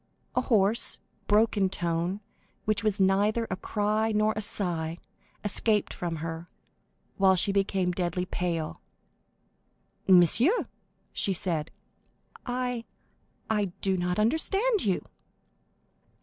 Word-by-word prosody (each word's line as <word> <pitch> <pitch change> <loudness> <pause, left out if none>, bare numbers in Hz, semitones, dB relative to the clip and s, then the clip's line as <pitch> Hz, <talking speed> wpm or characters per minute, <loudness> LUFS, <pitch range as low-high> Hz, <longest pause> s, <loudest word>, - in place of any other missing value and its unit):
A 250 - +2
hoarse, 220 -3 +2 0.3
broken 210 -2 +3
tone, 175 +2 -2 0.4
which 215 +1 +1
was 210 -1 0
neither 205 +4 +3
a - - 0
cry 215 +3 0
nor 215 0 +2
a 215 - -2
sigh, 170 -5 -2 0.5
escaped 210 0 +1
from 170 -2 -3
her, 165 +2 -6 0.7
while 190 -1 +5
she 195 +3 +2
became 195 -2 +1
deadly 180 0 -1
pale. 170 -3 -3 1.3
"Monsieur," 235 - +5 0.5
she 195 - 0
said, 165 -3 -2 0.8
"I—I 245 -3 -4 0.2
do 190 -1 +2
not 180 0 -1
understand 390 - +1
you." 190 -3 0
195 Hz, 105 wpm, -28 LUFS, 180-220 Hz, 1.3 s, while